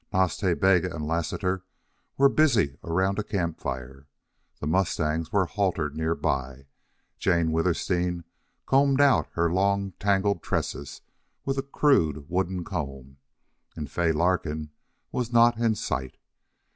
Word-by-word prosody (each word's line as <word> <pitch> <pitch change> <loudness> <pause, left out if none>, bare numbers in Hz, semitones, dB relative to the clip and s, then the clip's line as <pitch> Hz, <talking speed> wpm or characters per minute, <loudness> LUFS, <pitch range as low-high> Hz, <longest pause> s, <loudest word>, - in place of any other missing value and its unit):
Nas 95 -5 +2
Ta 95 -4 0
Bega 90 -1 +2
and 75 -2 -4
Lassiter 90 +3 -1 0.5
were 140 - +6
busy 125 - +3
around 95 +4 0
a - - -1
camp 85 -6 -2
fire; 65 +2 -6 0.5
the - - -5
mustangs 80 -1 0
were 100 -3 +2
haltered 85 -6 -1
near 80 +1 0
by; 65 -1 -2 0.5
Jane 85 -3 +2
Withersteen 85 +1 0 0.4
combed 135 0 +3
out 140 -3 +4
her 85 0 +1
long, 100 +1 +1
tangled 100 -2 +1
tresses 70 +1 -3 0.4
with 135 0 -1
a - - +2
crude 85 - +1
wooden 90 0 -1
comb; 70 -7 -6 0.6
and 75 -5 -6
Fay 85 -2 +1
Larkin 80 -2 0 0.4
was 120 -2 -2
not 120 -1 +5
in 115 -2 +2
sight. 65 -10 -4
90 Hz, 130 wpm, -26 LUFS, 75-100 Hz, 0.6 s, were